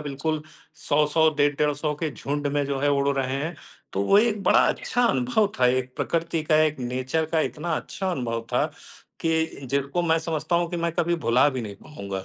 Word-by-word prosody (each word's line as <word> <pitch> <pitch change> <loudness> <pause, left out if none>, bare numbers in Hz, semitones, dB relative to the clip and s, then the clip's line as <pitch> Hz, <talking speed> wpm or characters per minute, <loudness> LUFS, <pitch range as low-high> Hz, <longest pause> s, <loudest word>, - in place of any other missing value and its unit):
बिल्कुल, 150 +2 -3 0.3
100-100 150 +2 +2
डेढ़ 145 0 +3
150 150 0 0
के 160 - 0
झुंड 145 +1 -3
में, 145 0 0
जो 140 -1 -2
है, 145 - +2
उड़ 140 0 +2
रहे 130 -1 -1
हैं। 165 +3 -3 0.4
तो 95 - 0
वो 200 - +5
एक 215 -2 +2
बड़ा - - +5
अच्छा 245 - -1
अनुभव 240 -3 +2
था, 125 - +5
एक 130 0 0
प्रकृति 165 -1 -1
का, 155 0 +2
एक 155 -2 +1
नेचर 130 +5 -1
का 160 - +3
इतना 165 +2 -3
अच्छा 190 -1 -4
अनुभव 115 -8 -2
था - - +3 0.6
कि 160 0 +2 0.2
जिसको 140 +5 -1
मैं 165 -1 +2
समझता 165 +1 -1
हूँ 170 0 +1
कि 175 - -3
मैं 170 - -1
कभी 175 0 +1
भुला 125 +5 +5
भी 125 - -2
नहीं 100 -2 -7
पाऊँगा। 100 -8 -6
150 Hz, 200 wpm, -25 LUFS, 135-165 Hz, 0.6 s, वो